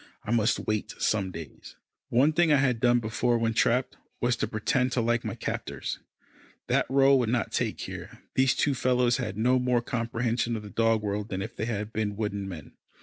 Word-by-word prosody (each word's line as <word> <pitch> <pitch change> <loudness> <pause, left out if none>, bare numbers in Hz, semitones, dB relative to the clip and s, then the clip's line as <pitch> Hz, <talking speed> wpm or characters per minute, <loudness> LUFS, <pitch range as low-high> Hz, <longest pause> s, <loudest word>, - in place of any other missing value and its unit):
I 105 - -4
must 115 -1 +2
wait 110 -1 -2
some 100 -3 0
days. 80 -5 -10 0.3
One 140 +6 +3
thing 170 0 +3
I - - +6
had 130 -4 +2
done 120 +1 +4
before 120 +1 0
when 115 0 0
trapped, 125 +3 +1 0.2
was 120 0 +1
to - - -1
pretend 125 +4 0
to 125 - +1
like 120 +1 +1
my - - -4
captors. - - -4 0.7
That - - +1
rôle 135 +1 +5
would 120 -3 0
not 120 -1 0
take - - -1
here. - - -8
These 130 -1 +3
two 145 - +2
fellows 125 -1 +2
had 110 -7 -4
no 125 +3 +3
more 125 -1 +1
comprehension 115 0 -1
of 110 - -5
the 105 - -9
dog 115 -1 +2
world 105 +1 -2
than 95 0 -3
if 110 - -8
they 110 - -2
had 110 -1 -3
been 105 -2 -1
wooden 100 -2 -3
men. 80 -6 -9
115 Hz, 205 wpm, -27 LUFS, 105-125 Hz, 0.7 s, I